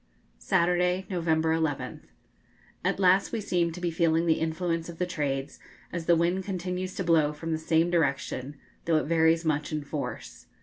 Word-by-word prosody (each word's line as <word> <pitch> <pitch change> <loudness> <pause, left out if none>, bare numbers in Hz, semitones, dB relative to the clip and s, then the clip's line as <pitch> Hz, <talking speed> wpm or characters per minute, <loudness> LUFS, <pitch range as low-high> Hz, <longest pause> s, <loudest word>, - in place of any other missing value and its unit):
Saturday, 180 +2 +1
November 160 -2 +1
11th. 160 -3 -2 0.8
At - - 0
last 190 +1 +4
we 230 - -2
seem 175 -4 0
to 170 - -8
be 175 -1 -1
feeling 165 0 +2
the 160 -2 +2
influence 165 +1 -2
of 170 - -9
the 180 - 0
trades, 145 -6 -3 0.3
as 170 -2 -4
the 170 - +6
wind 175 +3 +1
continues 185 -1 -4
to 185 - -2
blow 160 -4 +3
from 165 +2 -5
the 160 - 0
same 160 +2 +2
direction, 140 -3 -1 0.3
though 165 -2 +3
it - - +1
varies 165 +1 +3
much 150 -1 0
in 155 -1 -2
force. 145 0 -6
165 Hz, 175 wpm, -28 LUFS, 160-180 Hz, 0.8 s, the